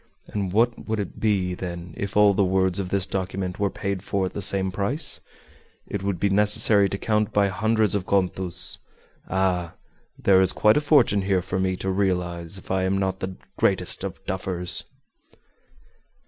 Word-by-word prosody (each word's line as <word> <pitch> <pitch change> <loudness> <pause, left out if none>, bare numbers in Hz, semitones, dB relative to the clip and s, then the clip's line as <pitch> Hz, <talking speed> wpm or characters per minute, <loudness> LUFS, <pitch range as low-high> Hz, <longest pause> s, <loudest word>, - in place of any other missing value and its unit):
And 100 -3 -3
what 115 +4 +1
would 110 -1 0
it 100 - -5
be, 95 -4 +1
then, 85 -2 -6
if 100 +1 -4
all 105 -1 +6
the 100 +1 +2
words 95 0 +1
of 95 -2 -3
this 95 -1 0
document 95 -1 -4
were 100 -1 +1
paid 100 -1 -4
for 100 0 -1
at 95 - -5
the 100 - -4
same 95 0 +1
price? 125 - -2 0.6
It 100 - -4
would 95 -3 -2
be 100 - +2
necessary 105 0 +4
to 100 - -3
count 105 0 0
by 100 -1 +2
hundreds 110 +2 +1
of 100 -3 -2
contos. 90 -2 0 0.5
Ah! 90 -3 0 0.4
there 95 -1 +4
is 95 -1 +4
quite 105 0 +4
a - - +2
fortune 140 -9 +4
here 95 -2 0
for 95 - -3
me 95 0 0
to 95 +1 -3
realize 90 -2 -1
if 95 - -10
I 95 0 +1
am 95 +1 +1
not 95 -1 -1
the 95 0 -5 0.2
greatest - - 0
of - - -6
duffers!" 90 -1 +1
95 Hz, 180 wpm, -24 LUFS, 95-100 Hz, 0.6 s, all